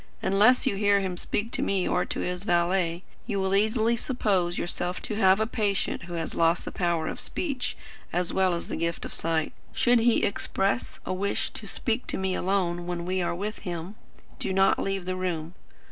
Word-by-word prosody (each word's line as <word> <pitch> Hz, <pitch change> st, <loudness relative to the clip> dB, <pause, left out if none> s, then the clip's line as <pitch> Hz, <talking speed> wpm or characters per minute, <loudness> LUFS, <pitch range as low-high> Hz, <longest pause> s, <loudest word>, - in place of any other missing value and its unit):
Unless 205 Hz, +7 st, +5 dB
you 200 Hz, -, +1 dB
hear 205 Hz, 0 st, +4 dB
him 190 Hz, -2 st, -2 dB
speak 205 Hz, +5 st, -2 dB
to -, -, 0 dB
me 195 Hz, -2 st, +1 dB
or 180 Hz, -, +1 dB
to -, -, -3 dB
his 180 Hz, +1 st, -3 dB
valet, 175 Hz, -2 st, +1 dB, 0.2 s
you 205 Hz, -4 st, -1 dB
will 190 Hz, 0 st, 0 dB
easily 220 Hz, +3 st, +3 dB
suppose 195 Hz, -8 st, 0 dB
yourself 175 Hz, +1 st, -2 dB
to -, -, -3 dB
have 195 Hz, -2 st, +5 dB
a 220 Hz, -, +2 dB
patient 205 Hz, -5 st, -1 dB
who 175 Hz, -, -8 dB
has 165 Hz, -1 st, -3 dB
lost 165 Hz, +1 st, +2 dB
the -, -, -4 dB
power 170 Hz, -3 st, 0 dB
of -, -, -4 dB
speech 275 Hz, -8 st, -3 dB, 0.3 s
as 175 Hz, 0 st, 0 dB
well 185 Hz, -2 st, +3 dB
as 170 Hz, -, -5 dB
the -, -, -3 dB
gift 170 Hz, 0 st, -2 dB
of -, -, -6 dB
sight. 160 Hz, -1 st, -1 dB, 0.2 s
Should 240 Hz, -1 st, +4 dB
he 230 Hz, 0 st, +3 dB
express 200 Hz, +1 st, -1 dB
a -, -, -1 dB
wish 200 Hz, +2 st, -1 dB
to -, -, -8 dB
speak 235 Hz, 0 st, -1 dB
to -, -, -1 dB
me 190 Hz, 0 st, 0 dB
alone 180 Hz, -2 st, 0 dB
when 175 Hz, -1 st, -3 dB
we 185 Hz, +1 st, 0 dB
are 175 Hz, -, -1 dB
with 210 Hz, +4 st, -4 dB
him, 175 Hz, +1 st, -5 dB, 0.5 s
do -, -, -1 dB
not 195 Hz, +1 st, +4 dB
leave 195 Hz, -2 st, -2 dB
the 185 Hz, 0 st, -2 dB
room. 175 Hz, -3 st, -3 dB
190 Hz, 205 wpm, -27 LUFS, 175-205 Hz, 0.5 s, Unless